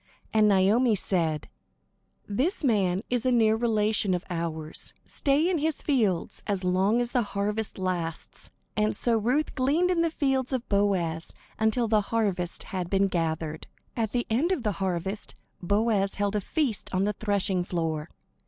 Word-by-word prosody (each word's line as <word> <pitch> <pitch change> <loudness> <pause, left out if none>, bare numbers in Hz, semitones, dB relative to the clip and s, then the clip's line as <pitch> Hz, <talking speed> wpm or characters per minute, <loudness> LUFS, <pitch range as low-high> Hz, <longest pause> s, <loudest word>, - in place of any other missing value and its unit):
And 215 -1 +5
Naomi 210 +4 +4
said: 165 -5 0 0.8
"This 270 - -1
man 200 -6 +2
is 245 -2 +1
a 255 - +2
near 220 -3 +4
relation 215 -4 +1
of 180 - -5
ours. 160 -2 -4
Stay 285 +4 +2
in 360 -3 +1
his 310 0 -1
fields, 215 - 0
as 200 -3 -1
long 190 +5 +2
as 240 0 -1
the 245 - +2
harvest 210 +1 -2
lasts." 175 -4 -4 0.3
And 215 0 +1
so 235 -1 +2
Ruth 250 +8 +1
gleaned 305 +8 +2
in 345 -2 +2
the 335 - +2
fields 270 -4 0
of 255 -1 -2
Boaz 185 -5 0 0.3
until 220 +2 +2
the 215 -1 +3
harvest 200 -5 -1
had 180 -2 -4
been 195 0 +2
gathered. 160 -2 -2 0.3
At 225 -3 -1
the 240 -1 0
end 270 +11 +1
of 315 -10 0
the 210 - +1
harvest, 190 +2 -3 0.3
Boaz 200 +1 +1
held 205 0 -1
a 210 - +1
feast 260 - -2
on 185 0 +1
the 210 +1 +1
threshing 200 -3 0
floor. 165 -3 -2
210 Hz, 160 wpm, -27 LUFS, 185-240 Hz, 0.8 s, And